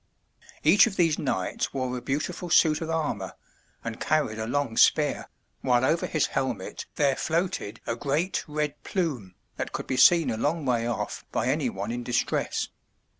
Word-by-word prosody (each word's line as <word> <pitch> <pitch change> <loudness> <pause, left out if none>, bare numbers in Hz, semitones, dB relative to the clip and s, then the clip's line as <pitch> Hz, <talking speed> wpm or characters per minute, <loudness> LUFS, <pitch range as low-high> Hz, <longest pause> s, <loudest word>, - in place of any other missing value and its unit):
Each 180 +9 +7
of 200 - -4
these 165 -4 +2
knights 110 -2 -2
wore 130 -1 -1
a 125 - -4
beautiful 155 +7 -3
suit 160 -2 +4
of 165 - -4
armor 145 - -2 0.5
and 115 -1 -5
carried 150 -8 0
a 110 - -3
long 135 -2 -1
spear, - - +3 0.3
while 125 0 +3
over 165 +5 +1
his 155 - +1
helmet 130 -8 -3
there 140 -2 +2
floated 165 - -2
a 115 - -1
great 150 +9 -1
red 150 -1 -3
plume 130 - -2 0.2
that - - -4
could - - -4
be 130 - -2
seen 165 +5 +6
a 110 - -2
long 150 +5 -1
way 120 -2 +1
off 120 - -3
by - - 0
any - - +1
one 100 +3 -4
in 120 +1 -3
dis 120 0 -1
tress. - - -2
140 Hz, 175 wpm, -27 LUFS, 120-160 Hz, 0.5 s, Each